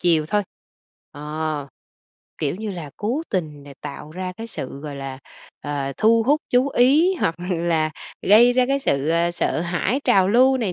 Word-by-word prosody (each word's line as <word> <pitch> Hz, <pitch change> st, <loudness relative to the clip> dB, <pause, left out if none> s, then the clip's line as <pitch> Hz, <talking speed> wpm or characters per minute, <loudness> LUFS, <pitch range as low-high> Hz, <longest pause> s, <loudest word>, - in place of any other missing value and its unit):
chiều 165 Hz, -3 st, +2 dB
thôi, 205 Hz, +5 st, +1 dB, 0.7 s
ờ, 150 Hz, -1 st, -4 dB, 0.7 s
kiểu 150 Hz, +2 st, -1 dB
như 215 Hz, +1 st, -4 dB
là, 170 Hz, -6 st, -7 dB
cố 240 Hz, +9 st, -2 dB
tình 155 Hz, -6 st, -3 dB
nà 140 Hz, 0 st, -12 dB
tạo 145 Hz, +1 st, -8 dB
ra 185 Hz, +1 st, -4 dB
cái 225 Hz, +1 st, -6 dB
sự, 135 Hz, -, -7 dB
gọi 145 Hz, -1 st, -6 dB
là, 135 Hz, -1 st, -6 dB, 0.4 s
ờ, 140 Hz, -2 st, -3 dB
thu 225 Hz, +1 st, +4 dB
hút, 290 Hz, +6 st, +2 dB
chú 250 Hz, +2 st, +3 dB
ý 285 Hz, +9 st, +4 dB
hoặc 165 Hz, -, +1 dB, 0.2 s
là 165 Hz, -3 st, +1 dB, 0.4 s
gây 235 Hz, +4 st, +7 dB
ra 250 Hz, 0 st, +3 dB
cái 275 Hz, +1 st, +1 dB
sự, 140 Hz, -, 0 dB
ơ, 170 Hz, +1 st, +2 dB
sợ 170 Hz, -1 st, -1 dB
hãi, 175 Hz, +9 st, -1 dB
trào 195 Hz, -7 st, +4 dB
lưu 255 Hz, +4 st, +5 dB
này 215 Hz, -7 st, -1 dB
175 Hz, 180 wpm, -22 LUFS, 150-235 Hz, 0.7 s, gây